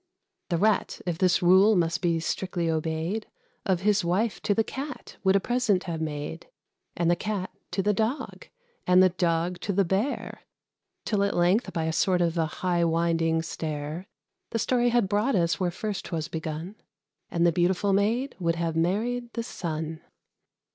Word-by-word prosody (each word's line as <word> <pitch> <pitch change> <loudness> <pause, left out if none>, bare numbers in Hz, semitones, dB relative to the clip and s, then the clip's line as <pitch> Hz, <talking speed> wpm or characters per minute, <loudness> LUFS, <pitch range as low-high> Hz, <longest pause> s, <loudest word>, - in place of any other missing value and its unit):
The 170 - +1
Rat, 215 +4 +1
if 175 -3 -2
this 180 -1 +3
rule 190 +5 +6
must 170 0 +1
be 170 -2 +1
strictly 170 0 -1
obeyed, 160 +6 -2 0.4
Of 185 -2 +1
his 205 0 +2
wife 195 +6 0
to 205 -1 +1
the 225 - +3
Cat 270 +4 -7
would 190 0 +4
a - - +5
present 220 -4 +1
have 165 -3 -4
made: 155 +1 -4 0.5
And 170 - +1
the - - +4
Cat 200 0 -3 0.2
to 195 - -1
the 210 +1 +2
Dog, 235 - -2 0.4
and 180 +1 +6
the 185 - +6
Dog 175 0 0
to 200 - -2
the 200 0 +2
Bear; 200 +10 -2 0.6
Till, 210 -3 +1
at 200 0 +1
length, 180 +7 +2
by 165 - -2
a 160 0 -1
sort 180 +2 +2
of 170 -1 +1
a 165 -2 +1
high 175 +2 0
winding 165 -1 +1
stair, 155 +2 -5 0.4
The 230 - -2
story 245 +2 +2
had 235 -4 +2
brought 210 +7 +1
us 170 -3 +1
where 180 -2 +1
first 200 +2 -4
'twas 160 -3 -3
begun, 160 +5 -5 0.5
And 170 -1 +1
the 170 - +5
beautiful 185 +4 +1
Maid 230 +7 +1
would 170 -2 +1
have 165 -1 -2
married 230 +9 0
the 230 - -2
Sun. 160 -6 -4
180 Hz, 175 wpm, -27 LUFS, 165-210 Hz, 0.6 s, rule